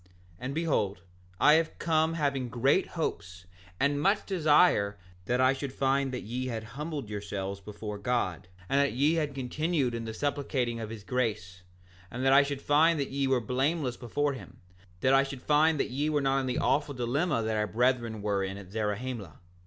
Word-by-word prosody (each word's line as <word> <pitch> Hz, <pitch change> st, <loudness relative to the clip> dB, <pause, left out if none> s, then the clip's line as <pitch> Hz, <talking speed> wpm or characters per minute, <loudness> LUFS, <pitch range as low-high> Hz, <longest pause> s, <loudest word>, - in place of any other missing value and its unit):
7:3 90 Hz, -, -27 dB, 0.3 s
And 130 Hz, +3 st, -4 dB
behold, 120 Hz, -, 0 dB, 0.4 s
I 150 Hz, -, +7 dB
have 160 Hz, 0 st, +1 dB
come 160 Hz, 0 st, +1 dB
having 140 Hz, -5 st, -1 dB
great 135 Hz, +9 st, +2 dB
hopes 95 Hz, -, -4 dB, 0.3 s
and 145 Hz, +1 st, +1 dB
much 200 Hz, +5 st, +2 dB
desire 150 Hz, -, +3 dB, 0.3 s
that 125 Hz, +1 st, 0 dB
I 130 Hz, +1 st, +5 dB
should 135 Hz, 0 st, -5 dB
find 135 Hz, 0 st, +1 dB
that 125 Hz, -, -4 dB
ye 125 Hz, +4 st, -3 dB
had 115 Hz, -3 st, -4 dB
humbled 150 Hz, -3 st, -4 dB
yourselves 100 Hz, -1 st, -4 dB
before 105 Hz, +1 st, -7 dB
God, 100 Hz, -7 st, -1 dB, 0.2 s
and 135 Hz, -, +2 dB
that 140 Hz, -, +1 dB
ye 145 Hz, +6 st, +3 dB
had 150 Hz, -4 st, -1 dB
continued 140 Hz, 0 st, -1 dB
in 115 Hz, -1 st, -4 dB
the 110 Hz, -, -5 dB
supplicating 135 Hz, -4 st, -1 dB
of 110 Hz, -2 st, -5 dB
his 110 Hz, -2 st, -8 dB
grace, 105 Hz, -7 st, -2 dB, 0.5 s
that 130 Hz, +2 st, +2 dB
I 140 Hz, -, +8 dB
should 140 Hz, -1 st, -3 dB
find 155 Hz, +2 st, +4 dB
that 140 Hz, -, -2 dB
ye 140 Hz, 0 st, 0 dB
were 130 Hz, -1 st, +3 dB
blameless 130 Hz, +3 st, 0 dB
before 140 Hz, +4 st, -1 dB
him, 130 Hz, -, -11 dB, 0.4 s
that 130 Hz, -, +3 dB
I 135 Hz, -, +6 dB
should 135 Hz, -2 st, -5 dB
find 155 Hz, +1 st, +3 dB
that -, -, -1 dB
ye 145 Hz, +4 st, 0 dB
were 150 Hz, -1 st, +1 dB
not 135 Hz, -1 st, +2 dB
in 130 Hz, -, -2 dB
the 125 Hz, -, -1 dB
awful 145 Hz, 0 st, +1 dB
dilemma 125 Hz, +2 st, 0 dB
that 110 Hz, 0 st, -1 dB
our 105 Hz, 0 st, 0 dB
brethren 115 Hz, 0 st, 0 dB
were 100 Hz, -2 st, 0 dB
in 95 Hz, +1 st, -4 dB
at 95 Hz, -2 st, -11 dB
Zarahemla. 110 Hz, -3 st, -3 dB
130 Hz, 190 wpm, -29 LUFS, 110-145 Hz, 0.5 s, I